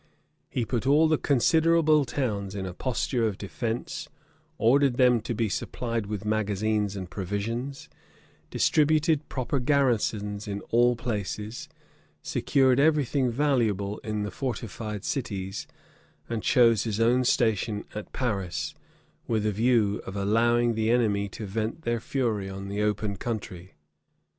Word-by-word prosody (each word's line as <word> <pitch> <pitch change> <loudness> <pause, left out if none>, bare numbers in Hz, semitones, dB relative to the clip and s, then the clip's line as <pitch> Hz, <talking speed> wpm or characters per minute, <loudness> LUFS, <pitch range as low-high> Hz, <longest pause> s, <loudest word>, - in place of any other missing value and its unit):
He 120 - -1
put 120 +1 -2
all 150 +3 +5
the 155 -1 +2
considerable 155 +2 +3
towns 105 -7 -2
in 95 -2 -3
a 90 - -5
posture 120 +1 -1
of 100 -3 -3
defence; 115 +3 -4 0.5
ordered 130 +2 +3
them 125 -3 +4
to 115 - -4
be 115 +1 0
supplied 115 +1 -3
with 105 0 -4
magazines 105 -1 0
and 95 -2 -5
provisions; 105 +9 -4 0.6
distributed 155 0 +2
proper 130 +1 -1
garrisons 115 -7 0
in 100 0 -4
all 120 +1 +4
places; 110 -1 -4 0.5
secured 130 -2 +2
every 150 -1 +4
thing 130 0 0
valuable 115 -7 0
in 105 -1 -3
the 105 - -4
fortified 110 -3 -4
cities; 100 -7 -3 0.6
and 115 -2 -3
chose 115 -3 +4
his 110 -2 -2
own 120 +3 +3
station 110 -3 +1
at 105 0 -7
Paris, 100 -9 -2 0.5
with 110 -2 0
a 105 - +2
view 110 -1 +2
of 95 - -6
allowing 115 +4 +2
the 110 0 0
enemy 105 -4 +2
to 105 - -7
vent 110 +9 -3
their 120 0 0
fury 110 -6 -1
on 95 0 -6
the 100 +1 -2
open 105 -1 -1
country. 95 -6 -5
115 Hz, 140 wpm, -27 LUFS, 105-125 Hz, 0.6 s, all